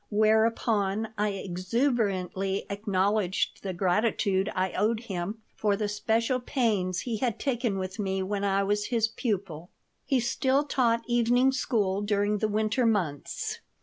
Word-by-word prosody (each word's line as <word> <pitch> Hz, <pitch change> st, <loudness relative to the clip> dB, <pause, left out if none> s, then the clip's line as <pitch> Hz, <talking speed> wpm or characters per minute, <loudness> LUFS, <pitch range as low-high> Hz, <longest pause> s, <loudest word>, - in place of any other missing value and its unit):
Whereupon 220 Hz, -1 st, +2 dB
I 210 Hz, 0 st, +1 dB
exuberantly 195 Hz, -1 st, -1 dB
acknowledged 200 Hz, -1 st, 0 dB
the 195 Hz, -, -3 dB
gratitude 195 Hz, +2 st, +1 dB
I 185 Hz, 0 st, 0 dB
owed 220 Hz, +3 st, 0 dB
him 205 Hz, 0 st, -5 dB
for 205 Hz, -2 st, +1 dB
the 210 Hz, +1 st, -1 dB
special 225 Hz, +4 st, 0 dB
pains 210 Hz, -8 st, 0 dB
he 235 Hz, -3 st, -3 dB
had 235 Hz, -2 st, -1 dB
taken 240 Hz, -7 st, -1 dB
with 185 Hz, +2 st, -5 dB
me 190 Hz, -1 st, -1 dB
when 200 Hz, +1 st, -2 dB
I 200 Hz, 0 st, +2 dB
was 205 Hz, +1 st, 0 dB
his 230 Hz, -3 st, +2 dB
pupil 190 Hz, -, -3 dB, 0.4 s
He 270 Hz, -3 st, +3 dB
still 260 Hz, +3 st, +1 dB
taught 240 Hz, -5 st, +1 dB
evening 240 Hz, +2 st, +3 dB
school 205 Hz, -7 st, 0 dB
during 205 Hz, 0 st, +1 dB
the 215 Hz, -, +1 dB
winter 215 Hz, +3 st, +1 dB
months. 175 Hz, -10 st, -2 dB
210 Hz, 140 wpm, -28 LUFS, 195-230 Hz, 0.4 s, He